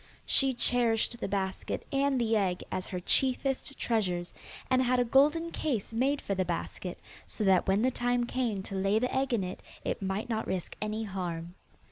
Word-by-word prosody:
She 270 -2 +4
cherished 235 -1 +2
the - - -2
basket 190 -1 -2
and 275 -1 +2
the 225 -1 +2
egg 185 -4 0
as 185 - -3
her 180 - -4
chiefest 270 +6 +1
treasures, 180 -7 -1 0.3
and 255 0 +3
had 255 0 +2
a 245 - +3
golden 300 +7 +3
case 245 -11 -2
made 270 +5 +1
for 200 - -2
the 190 -1 +1
basket, 175 +1 -4 0.3
so - - -3
that 190 -3 +4
when 195 +3 +3
the 260 - +3
time 245 0 +1
came 235 -6 -1
to 195 - -8
lay 195 +2 +2
the 250 +3 0
egg 265 0 +1
in 225 -5 +1
it, 180 0 -5 0.2
it - - -2
might 195 +4 -2
not 225 -2 -2
risk 185 -2 -3
any 215 +1 -2
harm. 175 -4 -4
225 Hz, 190 wpm, -30 LUFS, 190-255 Hz, 0.3 s, She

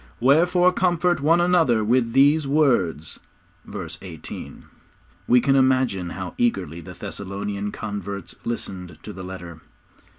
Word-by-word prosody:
'Wherefore, 175 +7 +4
comfort 175 -2 +1
one 165 +4 +4
another 165 -11 +3
with 115 +1 +1
these 145 +2 +4
words.' 125 - +1 0.5
(Verse - - -6
18.) - - -9 0.6
We 125 - +6
can 135 +3 +2
imagine 130 -9 +2
how 90 +1 -6
eagerly 95 -9 0
the 90 +2 -10
Thessalonian 100 +3 -5
converts 100 -2 -6
listened 95 -6 -5
to 105 - -8
the 95 - -8
letter. 90 -3 -9
115 Hz, 125 wpm, -23 LUFS, 95-145 Hz, 0.6 s, We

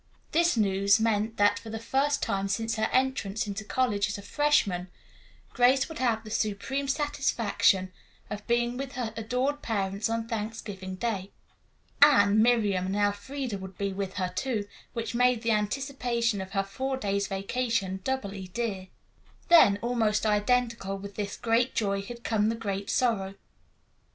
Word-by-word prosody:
This 340 -4 +3
news 200 0 +3
meant 220 0 0
that, 205 0 +3
for 225 - -10
the 225 - -4
first 270 +5 0
time 195 0 -1
since 225 +3 -1
her 220 0 0
entrance 255 -6 0
into 205 +1 -4
college 210 -3 0
as 205 - -3
a 200 - -9
freshman, 200 -9 +1 0.6
Grace 255 +2 +4
would 320 - -8
have 230 -3 +1
the 215 - -9
supreme 225 +6 -1
satisfaction 230 -9 +1 0.4
of 210 -1 -7
being 240 +1 +1
with 270 0 -5
her 240 -3 -3
adored 250 +6 -1
parents 200 -1 -1
on 230 0 -2
Thanksgiving 210 -4 -5
Day. 195 -2 -2 0.7
Anne, 215 -8 +6
Miriam 210 -6 +2
and 190 - -2
Elfreda 205 +3 -1
would 190 -1 -9
be 200 -1 -2
with 195 -1 -4
her, 185 -2 -2
too, 220 -3 -2 0.3
which 230 +1 -3
made 245 -1 +2
the 230 - +2
anticipation 235 -1 0
of 190 +1 -8
her 195 -1 +1
four 260 +7 -3
days' 200 -4 -1
vacation 195 -1 -1
doubly 200 -7 -3
dear. 195 -2 -3 0.6
Then 255 -13 +7
almost 225 -3 +1
identical 215 -1 +1
with 200 +1 -8
this 200 -1 -4
great 235 +2 +1
joy 200 -2 0
had 235 +4 -9
come 215 -1 +1
the 230 - -1
great 200 -2 -4
sorrow. 210 -7 0
220 Hz, 155 wpm, -28 LUFS, 200-245 Hz, 0.7 s, Then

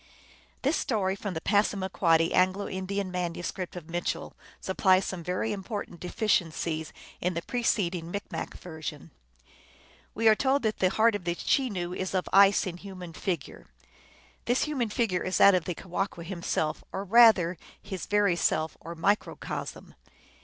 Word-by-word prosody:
This 285 +4 +2
story 195 -5 0
from 200 -2 -5
the 160 - -3
Passamaquoddy 190 -5 +2
Anglo 185 +2 +2
Indian 190 0 -3
manuscript 180 +1 -4
of 170 -3 -8
Mitchell 175 +1 -3 0.3
supplies 190 0 +3
some 180 -3 -5
very 185 +6 -1
important 200 -3 -6
deficiencies 170 -5 -1 0.3
in 180 0 -1
the 170 - -3
preceding 185 -8 0
Micmac 200 +3 -5
version. 160 -4 -7 1.0
We 225 +1 +2
are 220 - +9
told 270 +4 +1
that 220 -1 -1
the 185 - +4
heart 220 +4 +3
of 205 -3 -3
the 170 0 -1
Chenoo 185 -8 0
is 185 +1 -3
of 185 - 0
ice 195 +1 +6
in 175 -2 -5
human 185 -3 -9
figure. 165 -2 -4 0.8
This 245 +2 +2
human 270 -7 -1
figure 205 -5 0
is 185 - -1
that 200 - +8
of 180 -3 +1
the 180 - -3
Ke - - -11
wahqu 180 -1 -3
himself, 170 -4 -2
or 190 - -3
rather 200 -5 +6 0.2
his 190 -3 -6
very 205 -3 +3
self, 155 -2 0
or 170 +1 -8
microcosm. 200 +6 -2
185 Hz, 155 wpm, -28 LUFS, 175-205 Hz, 1.0 s, are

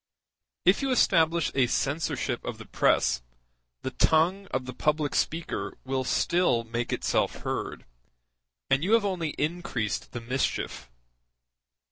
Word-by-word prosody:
If 185 +2 +5
you 275 - 0
establish 170 - +3
a 130 -2 +3
censorship 140 +6 -1
of - - -5
the - - -10
press, - - +2 0.6
the - - -2
tongue 180 +5 +2
of 130 -1 -2
the 125 - -6
public 150 +1 0
speaker 165 +1 -2
will 130 0 -1
still 150 -3 +2
make 115 +1 -3
itself - - 0
heard, - - -4 0.9
and 135 +3 +3
you 200 +5 +2
have 230 -2 +5
only 175 -6 -2
increased 150 - -2
the 120 - -5
mischief. 125 - -2
155 Hz, 130 wpm, -27 LUFS, 130-175 Hz, 0.9 s, If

